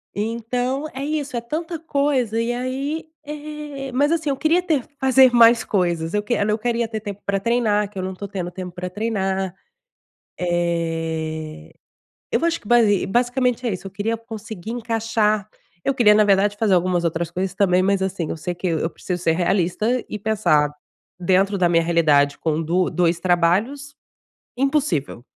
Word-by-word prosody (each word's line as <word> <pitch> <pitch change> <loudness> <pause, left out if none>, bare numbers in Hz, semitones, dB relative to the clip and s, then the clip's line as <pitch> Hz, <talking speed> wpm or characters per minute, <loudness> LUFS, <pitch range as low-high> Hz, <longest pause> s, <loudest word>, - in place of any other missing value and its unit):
Então, 245 +6 -2
é 270 +1 -5
isso, 290 -3 -3
é - - -2
tanta 320 +7 -4
coisa, 280 -7 0
e 230 +1 -1
aí, 270 +6 -3 0.2
eh, 295 -2 -7
mas 290 +4 +2
assim 315 -3 0
eu 275 - -1
queria 330 +3 +3
ter 305 -8 0 0.2
fazer 265 -1 +6
mais 235 0 +6
coisas, 170 -4 -1
eu 210 0 0
quer 210 -2 0
eu 210 0 +1
queria 235 0 -1
ter 220 -1 -4
tempo 205 -1 -7
pra 200 0 0
treinar, 210 -2 +1
que 210 - -13
eu - - -3
não 190 - -3
tô 200 +1 -6
tendo 185 -3 -4
tempo 180 0 -7
pra 180 0 -5
treinar. 195 -3 -2 0.9
Eh, 165 -2 -2 0.6
eu - - +1
vou, 335 - +1
acho 335 0 0
que 205 - -14
basi 220 -5 +4
basicamente 245 +2 +1
é 230 - 0
isso, 185 +1 -6
eu - - -6
queria 210 +4 -2
conseguir 220 -3 -8
encaixar, 225 -3 0 0.4
eu 275 - +1
queria 215 -5 +5
na 210 0 +5
verdade 205 +1 +3
fazer 205 -3 +2
algumas 180 -1 +1
outras 165 0 -1
coisas 185 +2 -3
também, 185 -2 +3
mas 195 0 +1
assim, 185 -4 -2
eu - - -3
sei 175 +3 -4
que 175 - -5
e - - 0
eu 165 +1 -1
preciso 180 -1 -5
ser 165 - +3
realista 190 +7 0
e 210 - -5
pensar 180 -9 +2 0.5
dentro 190 +3 +2
da 175 -1 +3
minha 165 -1 +3
realidade 155 -4 +3
com 160 0 -1
2 175 +3 0
2 175 -1 +2
trabalhos, 190 +12 +1 0.6
impossível. 265 - 0
210 Hz, 180 wpm, -22 LUFS, 180-245 Hz, 0.9 s, fazer